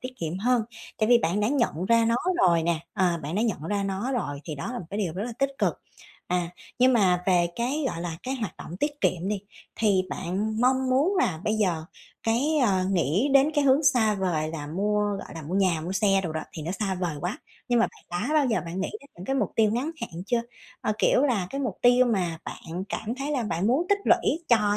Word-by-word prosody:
tiết 255 Hz, 0 st, -6 dB
kiệm 165 Hz, +2 st, -3 dB
hơn, 240 Hz, +2 st, +2 dB, 0.4 s
tại 215 Hz, -, +2 dB
vì 240 Hz, -1 st, +7 dB
bạn 185 Hz, +1 st, 0 dB
đã 210 Hz, -, +2 dB
nhận 235 Hz, -, 0 dB
ra 230 Hz, +3 st, +4 dB
nó 230 Hz, +1 st, +2 dB, 0.3 s
rồi 170 Hz, -2 st, +3 dB
nè, 165 Hz, -1 st, 0 dB
ờ, 175 Hz, -3 st, +1 dB
bạn 150 Hz, +4 st, -4 dB
đã 215 Hz, -, +1 dB
nhận 210 Hz, -10 st, -1 dB
ra 205 Hz, -1 st, 0 dB
nó 195 Hz, +7 st, -2 dB
rồi 145 Hz, -, -2 dB
thì 155 Hz, -, -5 dB
đó 145 Hz, -, -5 dB
là 245 Hz, -, -4 dB
một 170 Hz, -, -8 dB
cái 200 Hz, -, -3 dB
điều 180 Hz, -6 st, -1 dB
rất 190 Hz, -, -3 dB
là 240 Hz, -, -5 dB
tích 275 Hz, 0 st, +1 dB
cực. -, -, +1 dB, 0.5 s
À, 175 Hz, -1 st, -1 dB, 0.3 s
nhưng 255 Hz, +1 st, +5 dB
mà 185 Hz, -6 st, +3 dB
về 175 Hz, -2 st, +4 dB
cái, 265 Hz, +6 st, -1 dB
gọi 165 Hz, -, -5 dB
là, 170 Hz, -2 st, -4 dB
cái 260 Hz, +1 st, -2 dB
hoạt 230 Hz, -6 st, -4 dB
động 170 Hz, -, -8 dB
tiết 290 Hz, +7 st, -2 dB
kiệm 180 Hz, +1 st, 0 dB
đi, 205 Hz, -1 st, -1 dB, 0.4 s
thì 200 Hz, -4 st, +3 dB
bạn 205 Hz, +5 st, -2 dB
mong 260 Hz, +1 st, +2 dB
muốn 295 Hz, +10 st, +3 dB
là 160 Hz, -, +1 dB
bây 215 Hz, -, +1 dB
giờ 180 Hz, -7 st, 0 dB, 0.4 s
cái, 270 Hz, +8 st, +1 dB
ờ, 190 Hz, -3 st, +2 dB
nghĩ 185 Hz, -, +1 dB
đến 275 Hz, +2 st, +6 dB
cái 290 Hz, -2 st, +2 dB
hướng 275 Hz, +2 st, +4 dB
xa 245 Hz, -7 st, +4 dB
vời 175 Hz, -6 st, -1 dB
là 155 Hz, -3 st, -5 dB
mua, 205 Hz, +7 st, 0 dB, 0.2 s
gọi 195 Hz, -, -9 dB
là, 165 Hz, -, -7 dB
mua 160 Hz, +6 st, -5 dB
nhà, 185 Hz, -5 st, +2 dB
mua 175 Hz, +4 st, -4 dB
xe 195 Hz, -1 st, +3 dB
đồ 160 Hz, -, -2 dB
đó, 160 Hz, -, -2 dB
thì 155 Hz, -, -6 dB
nó 165 Hz, -, -3 dB
xa 195 Hz, 0 st, -2 dB
vời 175 Hz, -4 st, -2 dB
quá, 180 Hz, +5 st, -3 dB, 0.3 s
nhưng 240 Hz, -, +3 dB
mà -, -, +4 dB
bạn 175 Hz, 0 st, -7 dB
đã 285 Hz, +7 st, -1 dB
bao 300 Hz, -3 st, +4 dB
giờ 230 Hz, -3 st, +1 dB
bạn 175 Hz, +3 st, -4 dB
nghĩ 195 Hz, -, -2 dB
đến 280 Hz, -, -18 dB
những 175 Hz, -, -9 dB
cái 270 Hz, -, -1 dB
mục -, -, 0 dB
tiêu 220 Hz, -2 st, +4 dB
ngắn 255 Hz, +7 st, -1 dB
hạn 170 Hz, +1 st, -5 dB
chưa? 240 Hz, 0 st, +1 dB, 0.4 s
Ơ, 215 Hz, -, 0 dB
kiểu -, -, +4 dB
là, 235 Hz, -10 st, +1 dB
cái 275 Hz, -, -3 dB
mục 245 Hz, -9 st, -3 dB
tiêu 245 Hz, +1 st, +6 dB
mà 180 Hz, -8 st, 0 dB
bạn 175 Hz, +3 st, -6 dB
cảm 225 Hz, +2 st, -3 dB
thấy 280 Hz, +2 st, -3 dB
là 265 Hz, -5 st, 0 dB
bạn 180 Hz, -2 st, -1 dB
muốn 275 Hz, +10 st, +2 dB
tích 405 Hz, 0 st, +3 dB
lũy 335 Hz, +3 st, +2 dB
cho 210 Hz, -3 st, +3 dB
205 Hz, 250 wpm, -26 LUFS, 175-245 Hz, 0.5 s, vì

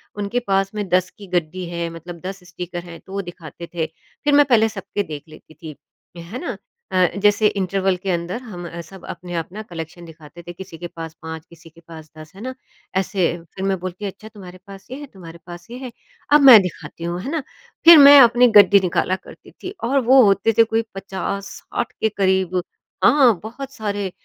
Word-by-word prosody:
उनके 205 Hz, +4 st, -2 dB
पास 195 Hz, 0 st, +1 dB
में 205 Hz, -2 st, -3 dB
10 185 Hz, 0 st, +2 dB
की 200 Hz, -, -12 dB
गड्डी 180 Hz, 0 st, -2 dB
है, 170 Hz, -1 st, -3 dB
मतलब 165 Hz, +1 st, -10 dB
10 190 Hz, -1 st, -6 dB
स्टीकर 175 Hz, 0 st, -7 dB
हैं, 170 Hz, -1 st, -11 dB
तो 190 Hz, -, -14 dB
वो 200 Hz, -, -2 dB
दिखाते 170 Hz, -2 st, -10 dB
थे। 165 Hz, -2 st, -1 dB, 0.4 s
फिर 295 Hz, -1 st, +2 dB
मैं 290 Hz, 0 st, +6 dB
पहले 225 Hz, -4 st, +3 dB
सबके 205 Hz, -1 st, -4 dB
देख 150 Hz, -5 st, -8 dB
लेती 155 Hz, 0 st, -16 dB
थी, 155 Hz, -1 st, -10 dB, 0.4 s
है 170 Hz, +9 st, -8 dB
ना। 345 Hz, -, -5 dB, 0.3 s
अ, 185 Hz, -1 st, +3 dB
जैसे 205 Hz, +1 st, +3 dB
इंटरवल 195 Hz, -1 st, 0 dB
के 190 Hz, +2 st, -6 dB
अंदर 175 Hz, +6 st, -3 dB
हम 180 Hz, -8 st, -8 dB
अ, 170 Hz, 0 st, -7 dB
सब 185 Hz, +2 st, -13 dB
अपना-अपना 175 Hz, +3 st, -6 dB
कलेक्शन 165 Hz, 0 st, -8 dB
दिखाते 160 Hz, 0 st, -13 dB
थे। 175 Hz, -, -6 dB
किसी 185 Hz, -1 st, -10 dB
के 175 Hz, +1 st, -6 dB
पास 165 Hz, -1 st, -9 dB
5 160 Hz, 0 st, -8 dB
किसी 170 Hz, -1 st, -16 dB
के 165 Hz, +1 st, -20 dB
पास 160 Hz, -2 st, -11 dB
10, 155 Hz, 0 st, -12 dB
है 195 Hz, -, -12 dB
ना। 260 Hz, +2 st, -5 dB, 0.4 s
ऐसे 190 Hz, -2 st, +1 dB, 0.3 s
फिर 190 Hz, -, -4 dB
मैं 195 Hz, -1 st, 0 dB
बोलती 185 Hz, +3 st, -6 dB
अच्छा, 200 Hz, +2 st, -8 dB
तुम्हारे 190 Hz, -4 st, -12 dB
पास 195 Hz, -1 st, -12 dB
ये 260 Hz, -, -5 dB
है 290 Hz, -, -8 dB
तुम्हारे 170 Hz, -3 st, -12 dB
पास 175 Hz, 0 st, -10 dB
ये 245 Hz, -, -7 dB
है, 255 Hz, -1 st, -8 dB, 0.4 s
अब 295 Hz, -, +7 dB
मैं 260 Hz, -5 st, +10 dB
दिखाती 175 Hz, -2 st, -7 dB
हूँ, 170 Hz, +1 st, -3 dB
है 270 Hz, -, -5 dB
ना। 325 Hz, -, -1 dB, 0.4 s
फिर 335 Hz, 0 st, +11 dB
मैं 285 Hz, 0 st, +10 dB
अपनी 245 Hz, 0 st, +6 dB
गड्डी 200 Hz, 0 st, +7 dB
निकाला 180 Hz, +1 st, 0 dB
करती 190 Hz, -, -15 dB
थी 370 Hz, -, -5 dB
और 270 Hz, +4 st, +2 dB
वो 260 Hz, +2 st, +6 dB
होते 200 Hz, +3 st, +2 dB
थे 230 Hz, -, +8 dB
कोई 225 Hz, 0 st, 0 dB
50-60 195 Hz, +4 st, -5 dB
के 220 Hz, -, +2 dB
करीब 190 Hz, -3 st, 0 dB, 0.4 s
हाँ, 250 Hz, -10 st, +5 dB
बहुत 265 Hz, +5 st, -8 dB
सारे। 205 Hz, -5 st, -3 dB
190 Hz, 205 wpm, -20 LUFS, 170-215 Hz, 0.4 s, फिर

